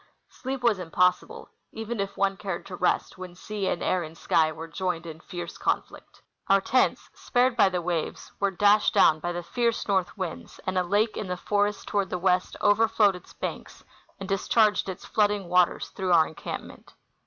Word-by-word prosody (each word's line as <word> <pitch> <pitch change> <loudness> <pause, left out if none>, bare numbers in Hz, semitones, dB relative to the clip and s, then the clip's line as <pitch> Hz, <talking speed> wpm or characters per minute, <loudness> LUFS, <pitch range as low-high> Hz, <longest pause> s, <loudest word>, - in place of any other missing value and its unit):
Sleep 265 0 -5
Avas 230 -5 +2
impossible, 180 +1 0 0.2
even 225 0 -5
if 200 0 -3
one 195 0 +1
cared 190 -3 -5
to 185 - -7
rest 180 - 0
AAdien 180 -1 -9
sea 205 0 -4
and - - -1
air 185 - +1
and 160 0 -8
sky 160 -1 +2
were 160 +1 -8
joined 175 -1 -3
in 160 -1 -8
fierce 175 -1 -8
conflict. - - -3 0.2
Our 195 0 +5
tents, 255 +6 +1
spared 245 0 +1
by 210 -4 +5
the 180 -2 -3
waves, 170 -2 -3
Avere 195 -2 0
dashed 205 +1 +4
doAvn 155 -1 +5
by 175 - -2
the 175 0 -4
fierce 235 +6 -1
north 190 -3 +1
Avinds, 185 -4 -6
and 185 - -2
a 185 - +3
lake 205 +4 +1
in 210 - -4
the 180 0 -3
forest 205 +2 -1
toAvard 200 -2 0
the 180 - -3
Avest 180 0 +1
overfloAved 215 -1 +4
its 180 0 -12
banks - - -6 0.4
and 195 - -6
discharged 210 +1 +2
its 185 - -7
flooding 205 -2 +1
Avaters 180 0 +2
through 185 -3 0
our 160 -2 +6
encampment. 160 - -8
190 Hz, 190 wpm, -26 LUFS, 175-210 Hz, 0.4 s, our